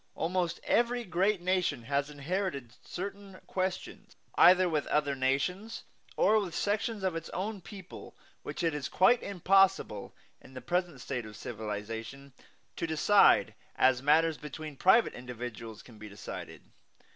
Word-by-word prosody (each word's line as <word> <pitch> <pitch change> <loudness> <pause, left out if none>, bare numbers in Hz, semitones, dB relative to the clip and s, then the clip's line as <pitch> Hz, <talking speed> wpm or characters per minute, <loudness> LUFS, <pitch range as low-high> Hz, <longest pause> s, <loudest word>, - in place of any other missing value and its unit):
Almost 175 0 -1
every 240 +1 +1
great 190 +1 0
nation 180 -8 0
has 140 +3 -1
inherited 145 - -3
certain 195 +1 -7
questions, 185 0 -4 0.2
either 180 +1 +6
with 155 -4 -1
other 150 -1 +1
nations 140 +11 -1 0.3
or 220 +1 +4
with 185 -5 -4
sections 210 0 -1
of 185 -3 0
its 165 0 -5
own 200 +2 -4
people, 190 0 -11 0.3
which 175 - -6
it 165 -2 +1
is 150 -2 -4
quite 235 +6 +4
impossible, 195 - +2 0.3
in 130 - -16
the - - -5
present 175 -4 -2
state 125 -4 -4
of 105 - -11
civilization, 110 +5 -6 0.4
to 165 - -2
decide 160 - +4 0.2
as 130 -1 +3
matters 155 +2 +3
between 150 0 -8
private 190 - +4
individuals 120 -3 -8
can 115 -4 -16
be 105 0 -9
decided. 100 - -8
165 Hz, 140 wpm, -30 LUFS, 130-190 Hz, 0.4 s, either